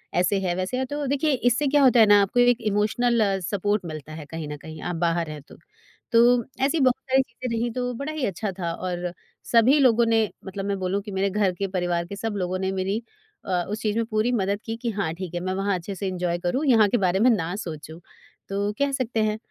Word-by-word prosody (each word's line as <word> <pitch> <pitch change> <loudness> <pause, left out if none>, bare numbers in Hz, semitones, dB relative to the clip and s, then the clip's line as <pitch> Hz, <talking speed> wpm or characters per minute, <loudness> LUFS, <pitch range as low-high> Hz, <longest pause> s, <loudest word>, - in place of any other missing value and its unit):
ऐसे 180 +3 +2
है 185 -2 -1
वैसे 185 +7 -2
है 260 - 0
तो 290 +2 -4
देखिए 285 +3 +1
इससे 250 +3 +1
क्या 285 +1 +3
होता 250 -3 +6
है 220 - +8
ना 205 -1 +6
आपको 200 +5 +1
एक 245 0 +4
इमोशनल 220 +3 +1 0.2
सपोर्ट 205 +2 -1
मिलता 155 -2 -7
है 155 -1 -8
कहीं 160 +1 -6
न 150 0 -6
कहीं 155 +1 -10
आप 175 - -3
बाहर 165 -1 0
हैं 150 -1 -7
तो। 140 - -16 0.6
तो 240 +1 +5 0.2
ऐसी 310 +4 +1
बहुत 255 -3 +4 0.2
सारी 265 +1 +5
चीज़ें 245 -2 -5
रहीं 235 +1 -1
तो 250 0 -2
बड़ा 280 +5 -4
ही 310 -4 -2
अच्छा 200 +1 -3
था, 170 -2 -2
और 175 0 -4 0.4
सभी 235 +5 +5
लोगों 240 -3 +4
ने 225 -2 +2 0.2
मतलब 195 0 -5
मैं 200 0 -1
बोलूँ 190 +2 -1
कि 205 +1 -9
मेरे 195 +1 0
घर 200 -1 +1
के 195 +2 -3
परिवार 175 -2 -1
के 200 - -6
सब 215 +1 -3
लोगों 185 0 -2
ने 190 0 -1
मेरी 195 +3 -1 0.4
अ, 180 -2 0
उस 210 +2 -4
चीज़ 210 -1 -1
में 230 - +1
पूरी 220 +2 0
मदद 200 -3 0
की 225 - -3
कि 240 - -1
हाँ 200 -6 -2
ठीक 180 0 -7
है 175 - -2
मैं 185 0 -1
वहाँ 195 +1 0
अच्छे 185 +3 -7
से 195 +1 -3
एन्जॉय 180 -2 -1
करूँ 180 - -1
यहाँ 225 -5 +6
के 240 - +2
बारे 185 -2 +1
में 240 +4 +5
ना 180 -6 0
सोचूँ। 160 -4 -7 0.5
तो 200 +1 -1
कह 280 0 +2
सकते 245 -4 -1
हैं 215 0 0
205 Hz, 245 wpm, -24 LUFS, 180-235 Hz, 0.6 s, है